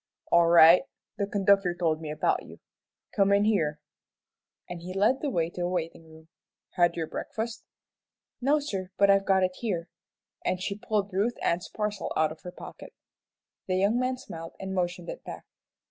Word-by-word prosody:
"All 170 Hz, 0 st, +5 dB
right; 170 Hz, +1 st, +8 dB, 0.4 s
the 200 Hz, -, 0 dB
conductor 195 Hz, -3 st, +2 dB
told 165 Hz, -3 st, 0 dB
me 155 Hz, -, -6 dB
about 150 Hz, 0 st, 0 dB
you. -, -, -13 dB, 0.6 s
Come 200 Hz, -1 st, +3 dB
in 200 Hz, 0 st, +4 dB
here," 160 Hz, -9 st, +1 dB, 0.9 s
and 175 Hz, -1 st, -7 dB
he 180 Hz, +2 st, -7 dB
led 215 Hz, +7 st, +2 dB
the 295 Hz, -, -1 dB
way 170 Hz, -8 st, -1 dB
to 180 Hz, -, -6 dB
a 175 Hz, -, 0 dB
waiting 165 Hz, -2 st, -4 dB
room. 160 Hz, 0 st, -16 dB, 0.4 s
"Had 175 Hz, -2 st, +2 dB
your 165 Hz, -2 st, -2 dB
breakfast?" 225 Hz, +7 st, -5 dB, 0.8 s
"No, 280 Hz, +4 st, +3 dB
sir, 195 Hz, -11 st, -4 dB
but 200 Hz, 0 st, +5 dB
I've 195 Hz, 0 st, +3 dB
got 190 Hz, -1 st, +4 dB
it 185 Hz, 0 st, -1 dB
here," 185 Hz, -7 st, -3 dB, 0.5 s
and 185 Hz, -, 0 dB
she 195 Hz, +2 st, -2 dB
pulled 205 Hz, -1 st, -2 dB
Ruth 210 Hz, +6 st, 0 dB
Ann's 175 Hz, +2 st, 0 dB
parcel 210 Hz, -1 st, -3 dB
out 155 Hz, -1 st, +2 dB
of 160 Hz, -, -11 dB
her 180 Hz, -, -8 dB
pocket. -, -, -11 dB, 0.7 s
The 185 Hz, -, 0 dB
young 200 Hz, +6 st, +2 dB
man 255 Hz, 0 st, 0 dB
smiled 165 Hz, -8 st, -9 dB
and 190 Hz, 0 st, -5 dB
motioned 180 Hz, -1 st, -2 dB
it -, -, -7 dB
back. -, -, -9 dB
185 Hz, 180 wpm, -28 LUFS, 170-205 Hz, 0.9 s, right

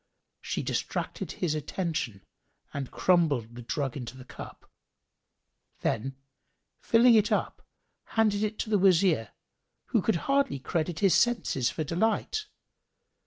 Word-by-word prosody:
She -, -, -3 dB
distracted -, -, -3 dB
his 175 Hz, -5 st, -1 dB
attention 155 Hz, -, -3 dB, 0.5 s
and 140 Hz, -2 st, -4 dB
crumbled 145 Hz, -11 st, +2 dB
the 120 Hz, -, -8 dB
drug 135 Hz, +2 st, -2 dB
into 125 Hz, -2 st, -6 dB
the 130 Hz, -, -11 dB
cup: -, -, -11 dB, 1.1 s
then, 135 Hz, +5 st, -1 dB, 0.6 s
filling 235 Hz, +1 st, +5 dB
it 215 Hz, -2 st, +4 dB
up, -, -, -1 dB, 0.6 s
handed 210 Hz, -2 st, +3 dB
it 215 Hz, 0 st, -2 dB
to 220 Hz, -, -5 dB
the 205 Hz, -, +4 dB
Wazir, 175 Hz, -, +4 dB, 0.6 s
who -, -, +3 dB
could -, -, +1 dB
hardly 275 Hz, -, +2 dB
credit 160 Hz, +5 st, -2 dB
his 195 Hz, -3 st, +5 dB
senses 230 Hz, -, +2 dB
for 155 Hz, -, -3 dB
delight. 220 Hz, -, 0 dB
170 Hz, 125 wpm, -28 LUFS, 135-210 Hz, 1.1 s, filling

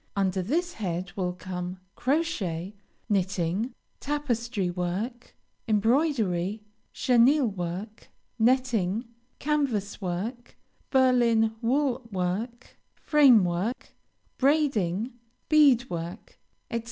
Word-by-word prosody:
Under 190 Hz, -1 st, +1 dB
this 335 Hz, -, -1 dB
head 180 Hz, -3 st, -3 dB
will 180 Hz, -2 st, -1 dB
come 180 Hz, 0 st, -5 dB, 0.2 s
Crochet, 210 Hz, -, -1 dB, 0.3 s
Knitting, 195 Hz, +2 st, 0 dB, 0.3 s
Tapestry 235 Hz, -9 st, -1 dB
work, 190 Hz, +8 st, -4 dB, 0.3 s
Embroidery, 215 Hz, -, +1 dB, 0.3 s
Chenille 255 Hz, +3 st, +4 dB
work, 185 Hz, +4 st, -6 dB, 0.3 s
Netting, 230 Hz, -3 st, +2 dB, 0.3 s
Canvas 255 Hz, -10 st, -1 dB
work, 205 Hz, +7 st, -4 dB, 0.3 s
Berlin 240 Hz, -4 st, +3 dB
wool 255 Hz, 0 st, 0 dB
work, 205 Hz, +7 st, -3 dB, 0.2 s
Frame 270 Hz, -, +5 dB
work, 180 Hz, +8 st, -2 dB, 0.5 s
Braiding, 255 Hz, -, +1 dB, 0.4 s
Bead 280 Hz, -6 st, +5 dB
work, 170 Hz, -2 st, -7 dB, 0.3 s
etc. 230 Hz, -, 0 dB
225 Hz, 85 wpm, -27 LUFS, 185-260 Hz, 0.5 s, Frame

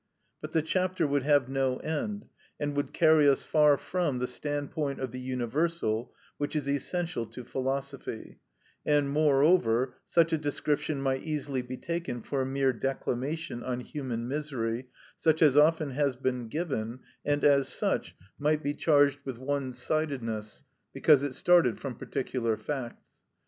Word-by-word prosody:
But -, -, -7 dB
the 160 Hz, -, +2 dB
chapter 185 Hz, 0 st, 0 dB
would 145 Hz, -1 st, +1 dB
have 145 Hz, -2 st, +3 dB
no 135 Hz, -1 st, 0 dB
end, 205 Hz, +7 st, -3 dB, 0.3 s
and 145 Hz, -1 st, -2 dB
would 145 Hz, -, -1 dB
carry 155 Hz, -3 st, +5 dB
us 135 Hz, -, +2 dB
far 150 Hz, -2 st, +4 dB
from 175 Hz, -7 st, -1 dB
the 125 Hz, -, -1 dB
standpoint 145 Hz, +2 st, -3 dB
of 130 Hz, -3 st, -3 dB
the 130 Hz, -, -6 dB
universal, 125 Hz, -1 st, -1 dB, 0.3 s
which 145 Hz, +1 st, -2 dB
is 145 Hz, -2 st, -1 dB
essential 145 Hz, -2 st, -2 dB
to 125 Hz, -, -9 dB
philosophy; 135 Hz, -1 st, -4 dB, 0.4 s
and, 145 Hz, -2 st, +2 dB
moreover, 140 Hz, -4 st, +3 dB
such 165 Hz, -1 st, +3 dB
a 160 Hz, -, +2 dB
description 145 Hz, -1 st, -1 dB
might 135 Hz, -1 st, 0 dB
easily 145 Hz, -4 st, -2 dB
be 125 Hz, +1 st, -7 dB
taken 170 Hz, -9 st, -4 dB
for 140 Hz, -2 st, -1 dB
a 130 Hz, -, -1 dB
mere 135 Hz, -1 st, +1 dB
declamation 135 Hz, +3 st, -3 dB
on 125 Hz, 0 st, -3 dB
human 125 Hz, -4 st, -4 dB
misery, 130 Hz, -4 st, -3 dB, 0.3 s
such 160 Hz, 0 st, +3 dB
as 150 Hz, -4 st, +6 dB
has -, -, +1 dB
often 155 Hz, -2 st, +4 dB, 0.2 s
been 125 Hz, -3 st, -1 dB
given, 130 Hz, -5 st, -3 dB, 0.2 s
and, 145 Hz, 0 st, 0 dB
as 140 Hz, -2 st, +5 dB
such, -, -, -1 dB, 0.2 s
might 150 Hz, +1 st, +1 dB
be 145 Hz, -, 0 dB
charged 145 Hz, -2 st, +3 dB
with 130 Hz, -4 st, -5 dB
one 135 Hz, 0 st, -2 dB
sidedness, 125 Hz, -5 st, -3 dB, 0.3 s
because 135 Hz, +1 st, +5 dB
it 140 Hz, -2 st, -3 dB
started 175 Hz, -10 st, +4 dB
from 135 Hz, -3 st, -4 dB
particular 115 Hz, -2 st, -2 dB
facts. 135 Hz, -5 st, -6 dB
140 Hz, 155 wpm, -29 LUFS, 130-150 Hz, 0.4 s, as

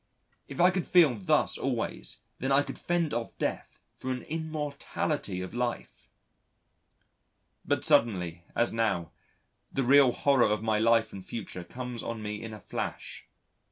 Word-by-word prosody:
If -, -, -8 dB
I 180 Hz, +2 st, +6 dB
could 185 Hz, -1 st, -2 dB
feel 170 Hz, -7 st, +6 dB
thus 100 Hz, -5 st, +1 dB
always, -, -, -3 dB, 0.2 s
then 130 Hz, +2 st, -1 dB
I 140 Hz, +1 st, +5 dB
could -, -, -8 dB
fend 170 Hz, -4 st, 0 dB
off 115 Hz, 0 st, -3 dB
Death -, -, -3 dB, 0.2 s
for 130 Hz, -, -6 dB
an 125 Hz, -1 st, -3 dB
immortality 150 Hz, -, -3 dB
of 95 Hz, -, -6 dB
life. 120 Hz, 0 st, -4 dB, 1.5 s
But -, -, 0 dB
suddenly, 90 Hz, -6 st, +2 dB
as 120 Hz, -, +2 dB
now, 110 Hz, -8 st, 0 dB, 0.6 s
the 135 Hz, -, 0 dB
real 135 Hz, 0 st, +6 dB
horror 135 Hz, -3 st, +3 dB
of 105 Hz, 0 st, 0 dB
my 110 Hz, -1 st, +2 dB
life 115 Hz, 0 st, +3 dB
and 95 Hz, -, -7 dB
future 95 Hz, -3 st, -6 dB
comes 125 Hz, +5 st, -6 dB
on 115 Hz, -2 st, -5 dB
me 105 Hz, 0 st, -4 dB
in 115 Hz, -, -6 dB
a 105 Hz, -, -8 dB
flash. -, -, -5 dB
120 Hz, 155 wpm, -29 LUFS, 105-140 Hz, 1.5 s, I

